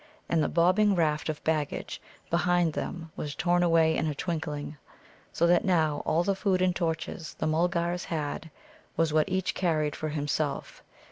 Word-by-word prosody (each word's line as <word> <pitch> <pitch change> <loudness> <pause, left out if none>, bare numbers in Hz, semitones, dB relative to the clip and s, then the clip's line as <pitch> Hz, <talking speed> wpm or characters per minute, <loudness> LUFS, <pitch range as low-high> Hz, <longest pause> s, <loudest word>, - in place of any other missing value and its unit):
And 165 - +2
the - - 0
bobbing 185 +4 +3
raft 155 -2 +1
of 155 - -4
baggage 155 -2 -2 0.3
behind 175 -1 +2
them 165 0 -5
was 150 -1 -5
torn 175 0 +2
away 165 -2 +4
in - - 0
a 150 - -2
twinkling, 150 -2 -4 0.5
so 170 - +1
that 175 0 +4
now 160 -5 +2
all 165 +2 +2
the 200 - +1
food 190 -1 +1
and 180 -1 +2
torches 165 -2 -3
the - - -2
Mulgars 170 +2 0
had 160 0 -3 0.5
was 165 -1 +2
what 155 +3 +3
each 185 0 0
carried 155 -5 0
for 155 - -3
himself. 145 0 -2
165 Hz, 165 wpm, -28 LUFS, 155-175 Hz, 0.5 s, away